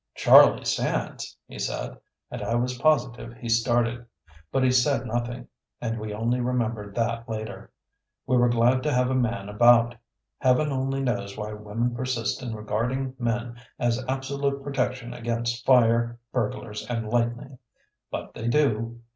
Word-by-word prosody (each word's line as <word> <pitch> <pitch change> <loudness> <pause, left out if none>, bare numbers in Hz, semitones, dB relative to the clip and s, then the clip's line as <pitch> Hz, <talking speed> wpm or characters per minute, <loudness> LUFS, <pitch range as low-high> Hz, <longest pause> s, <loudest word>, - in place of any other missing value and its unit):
"Charlie - - +7
Sands!" - - -2
he - - -10
said, - - -3 0.4
and - - -5
I 115 - -1
was 125 +1 -1
positive 120 -6 +1
he 120 0 -8
started. 120 +1 +1 0.5
But 135 - +1
he 130 - +4
said 130 0 +2
nothing, 120 +1 -3 0.3
and 115 -1 -3
we 110 0 -5
only 115 +4 0
remembered 115 -5 -2
that 115 0 -1
later. 110 0 -6 0.6
We 130 - +1
were 120 -1 +4
glad 120 +2 +3
to 150 - 0
have 125 0 +2
a - - +1
man 115 -6 0
about. 120 +3 +5 0.5
Heaven 135 +3 +3
only 135 0 -1
knows 115 -6 -2
why 105 0 -4
women 105 +3 -2
persist 120 -2 -2
in 120 -3 -4
regarding 120 +5 -2
men 120 0 -2 0.2
as 120 +1 0
absolute 140 +1 -2
protection 130 -3 -2
against 120 0 -3
fire, 120 -2 +4
burglars 105 -2 -3
and 115 -2 -2
lightning. 120 +3 -1 0.5
But - - -6
they 115 - -5
do. 120 -3 +1
120 Hz, 150 wpm, -26 LUFS, 115-125 Hz, 0.6 s, Charlie